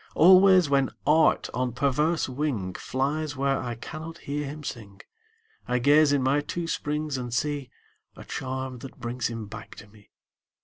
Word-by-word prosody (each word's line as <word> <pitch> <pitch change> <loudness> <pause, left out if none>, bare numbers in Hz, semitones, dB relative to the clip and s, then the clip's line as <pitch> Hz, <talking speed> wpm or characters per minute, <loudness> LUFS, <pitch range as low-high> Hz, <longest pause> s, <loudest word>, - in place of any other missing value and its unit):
Always, 185 0 +7
when 140 -1 +2 0.2
Art 155 +2 +4
on 125 0 -1
perverse 145 +5 +1
wing 125 -9 -2
Flies 145 +6 -2
where 135 0 0
I 120 -1 -4
cannot 155 +7 -8
hear 145 -1 -4
him 150 +2 -7
sing, 105 -7 -8 0.7
I 125 - +1
gaze 145 +4 +5
in 140 -2 +2
my 140 +3 +2
two 170 +3 -4
springs 150 -3 -2
and 120 -1 -5
see 145 +1 -2 0.5
A - - -11
charm 130 -1 -5
that 135 +2 -11
brings 120 0 -2
him 115 -2 -5
back 110 +2 -10
to - - -11
me. 105 0 -21
135 Hz, 165 wpm, -26 LUFS, 125-150 Hz, 0.7 s, Always